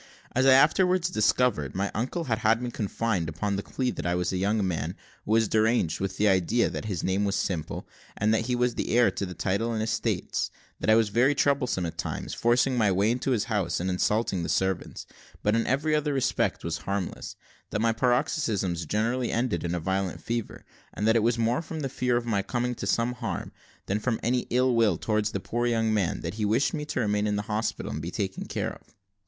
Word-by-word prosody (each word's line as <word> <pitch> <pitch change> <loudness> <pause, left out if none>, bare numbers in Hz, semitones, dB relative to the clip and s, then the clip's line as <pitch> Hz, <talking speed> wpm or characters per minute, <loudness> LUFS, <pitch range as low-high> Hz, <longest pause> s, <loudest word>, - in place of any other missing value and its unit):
As 130 +2 +2
I 130 - +8
afterwards 180 +5 +4
discovered, 105 - +1
my 100 +1 -1
uncle 130 - -2
had 115 -7 -1
had 115 -1 +3
me 125 0 -4
confined 105 -5 -1
upon 100 +5 -2
the 100 - -2
plea 125 +4 -2
that - - -6
I 85 - +1
was 90 +1 -1
a - - 0
young 100 +1 +1
man, 80 -1 -2 0.3
who - - -3
was 115 -1 +4
deranged 110 -7 +2
with 95 0 -3
an 105 - +3
idea 100 +4 +3
that - - -5
his 95 -6 -3
name 95 +2 +1
was 100 -1 0
Simple, 85 -5 -3 0.3
and 105 +2 +2
that 110 - 0
he 125 - +1
was 125 0 +1
the 115 - -1
heir 120 - +5
to 100 - -3
the 90 - -8
title 100 +7 0
and 110 -1 -1
estates; 110 - -1 0.3
that - - -1
I 110 - +7
was 110 -2 +3
very 125 +7 +3
troublesome 135 -10 +1
at 85 - -6
times, - - -4
forcing 120 +2 +2
my 105 -3 +3
way 100 +4 +2
into 125 +3 -1
his 120 -5 +2
house 100 -8 -1
and 95 +2 -1
insulting 100 +1 +1
the 85 - -3
servants, 95 -1 -1 0.4
but 105 +1 +3
in 115 - +1
every 150 +4 +1
other 150 -1 +1
respect 135 - 0
was 85 -1 -2
harmless; 100 +1 -4 0.3
that 105 - -2
my 115 +1 +2
paroxysms 115 - 0
generally 115 +6 0
ended 120 -1 0
in 85 0 -1
a - - -1
violent 95 +2 -2
fever, 115 -2 -4 0.3
and 105 +3 0
that 110 - +4
it - - +5
was 115 +2 +2
more 115 +6 +1
from 160 -1 -6
the 135 - -2
fear 125 -2 0
of 120 - -2
my 105 -4 +1
coming 125 +4 -2
to 115 - -5
some 120 +1 +1
harm, 125 - -4 0.3
than 100 +2 -1
from 115 +1 -1
any 125 +1 0
ill 125 +1 +3
will 110 -7 +3
towards 105 +2 0
the 100 - -3
poor 120 +5 -1
young 115 -2 +1
man, 100 -6 0
that 85 - -4
he - - +1
wished 110 +7 +2
me 150 -1 -3
to 150 - -3
remain 105 -1 +1
in 105 - 0
the 105 - -1
hospital, 105 +2 -2
and 75 - -4
be 85 - -4
taken 95 0 -3
care - - -2
of. - - -18
110 Hz, 230 wpm, -27 LUFS, 95-125 Hz, 0.4 s, I